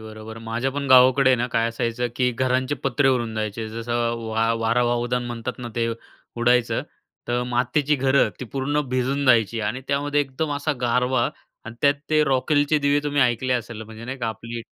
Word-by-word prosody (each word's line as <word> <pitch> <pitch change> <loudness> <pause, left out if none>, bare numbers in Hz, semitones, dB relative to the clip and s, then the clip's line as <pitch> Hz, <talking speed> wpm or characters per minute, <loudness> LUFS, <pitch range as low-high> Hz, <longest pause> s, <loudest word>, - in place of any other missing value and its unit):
बरोबर. 110 0 -9
माझ्या 115 +4 -2
पण 140 +1 -4
गावाकडे 130 +1 +6
आहे 130 - +4
ना 120 +1 -1
काय 115 0 +1
असायचं, 115 +1 -2
की 125 -1 +2
घरांचे 130 +3 0
पत्रे 135 +1 +1
उडून 120 -4 0
जायचे. 110 +1 -3
जसं 115 +2 -5 0.4
वा 115 +1 +1
वारा 115 +2 +2
वावदान 120 +1 0
म्हणतात 120 0 -5
ना 120 -1 -6
ते, 115 0 +1 0.5
उडायचं. 120 0 +2 0.5
तर 120 0 0
मातीची 130 +5 +1
घरं 135 +1 +3
ती - - -3
पूर्ण 140 +4 -1
भिजून 130 +3 0
जायची 115 -2 +3
आणि 110 +5 -2
त्यामध्ये 145 +1 +1
एकदम 145 +3 -3
असा 150 +1 -1
गारवा 125 0 +1 0.4
आणि 110 +1 -8
त्यात 140 0 +5 0.2
ते 155 -1 +4
रॉकेलचे 145 +3 +2
दिवे 145 0 +2
तुम्ही 145 -1 0
ऐकले 125 +1 +1
असेल 115 -2 -3
म्हणजे 110 +1 -10
नाही 130 +2 -6
का 120 - -2
आपली 115 +2 -6
125 Hz, 185 wpm, -23 LUFS, 115-135 Hz, 0.5 s, गावाकडे